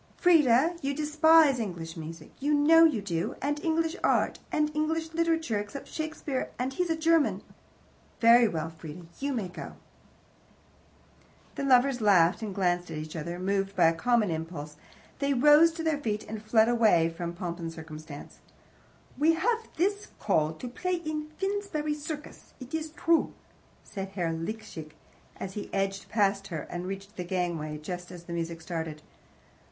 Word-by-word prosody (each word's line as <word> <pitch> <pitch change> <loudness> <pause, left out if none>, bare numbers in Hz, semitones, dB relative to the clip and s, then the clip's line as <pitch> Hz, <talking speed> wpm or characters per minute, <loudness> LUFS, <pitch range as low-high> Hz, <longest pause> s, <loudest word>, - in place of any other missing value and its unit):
"Frieda, 320 -2 +4
you 275 0 -1
despise 305 -2 +5
English 175 -7 -5
music. 160 -1 -8
You 295 +2 +2
know 325 +3 +7
you 240 -11 +1
do. 175 +1 -2
And 290 +2 -1
English 325 +1 +1
art. - - +2
And 300 0 0
English 320 +1 -1
Literature, 325 -9 +1
except 210 +7 -7
Shakespeare 310 -4 -4
and 255 +2 -2
he's 355 +4 -1
a 325 - +2
German. 325 -1 +2 0.8
Very 235 +1 +7
well, 160 -4 -3
Frieda, 160 +1 -10
you 280 +1 -1
may 225 -8 -2
go." 180 - -8 1.8
The - - -5
lovers 260 -1 +4
laughed 185 -2 +4
and 205 -4 -5
glanced 180 -2 0
at 160 - -5
each 155 +1 -6
other. 170 +2 -4
Moved 195 +1 -1
by 175 -3 +4
a - - 0
common 225 +1 +2
impulse, 160 -2 -5 0.4
they 280 -1 +1
rose 295 +5 +7
to 325 0 -5
their 315 -3 +1
feet 215 -6 -2
and 215 -1 -6
fled 220 +1 +4 0.5
from 170 0 -4
POMP 175 0 -5
AND 165 -1 -4
CIRCUMSTANCE. 155 -2 -10 0.8
"We 320 +2 +4
have 455 +7 0
this 405 +4 0
call 155 0 +1
to 205 +10 -8
play 365 +9 -2
in 310 -3 -4
Finsbury 385 -6 -2
Circus, 300 0 -8
it 255 +3 -10
is 320 -1 -2
true," 325 +1 +1 0.5
said 195 -2 -6
Herr 175 -4 0
Liesecke, 165 -2 -6 0.5
as 190 - -5
he 205 - -6
edged 195 0 -2
past 200 -2 +1
her 160 -4 -4
and 175 +1 -4
reached 195 +2 -7
the 180 - -3
gangway 170 -4 -2
just 180 +3 -7
as 175 -1 -10
the 170 - -7
music 165 0 -4
started. 160 -3 -5
220 Hz, 160 wpm, -28 LUFS, -, 1.8 s, know